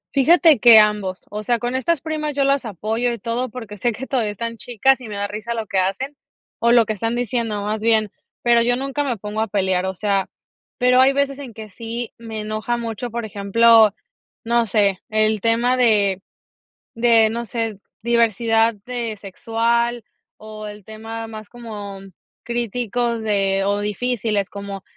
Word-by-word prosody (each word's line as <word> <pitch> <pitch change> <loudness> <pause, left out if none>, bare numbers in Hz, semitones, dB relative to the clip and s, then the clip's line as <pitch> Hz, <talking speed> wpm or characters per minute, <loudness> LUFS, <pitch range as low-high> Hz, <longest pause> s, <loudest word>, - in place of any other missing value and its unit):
Fíjate 315 +1 +5
que 235 0 +9
ambos. 210 -3 +1
O 210 - -4
sea, 240 +3 +1
con 240 +2 -3
estas 310 +4 +1
primas 305 -2 -3
yo 280 - +2
las 275 -1 +1
apoyo 220 +4 -2
y 235 - -4
todo, 235 +3 -3
porque 220 -3 -8
sé 235 +3 0
que 265 +5 -6
todavía 235 -7 -1
están 230 +2 -5
chicas 255 +4 +1
y 245 - -8
me 210 - -6
da 200 0 -2
risa 215 +3 -5
lo 225 - -3
que 195 -2 -1
hacen, 195 +10 -2 0.4
o 235 +1 +3
lo 235 -1 +6
que 215 - -2
están 225 +3 -2
diciendo, 230 -3 -2
más 210 +1 -2
bien, 220 -2 +2 0.3
pero 235 -1 +4
yo 245 +1 +2
nunca 275 +3 -2
me 250 -5 -2
pongo 210 +2 -4
a 220 - 0
pelear. 190 -2 0
O 190 - -3
sea, 200 0 0 0.5
pero 250 0 +4
hay 270 +1 +5
veces 280 0 0
en 255 -6 -9
que 220 -1 -8
sí 230 +3 -6
me 225 -2 -6
enoja 215 +3 -2
mucho, 235 +1 -4
por 235 0 -4
ejemplo, 220 +2 +5 0.5
no 235 0 +1
sé, 200 -2 +2
el 215 -1 +1
tema 235 +3 +2
de 205 -6 +3 0.7
de, 230 -1 +4
no 235 +2 -3
sé, 225 -2 -3 0.2
diversidad 230 -1 +2
de 235 -3 -4
sexual, 235 +4 -1 0.4
o 215 0 -9
el 210 0 -9
tema 225 +2 -7
más 215 -1 -10
como 210 -5 -8
mm 195 -1 -14 0.3
críticos 235 0 -2
de, 195 -3 +1
o 205 +1 0
difíciles, 210 -1 -1
como 200 -1 -7
225 Hz, 180 wpm, -21 LUFS, 210-240 Hz, 0.7 s, que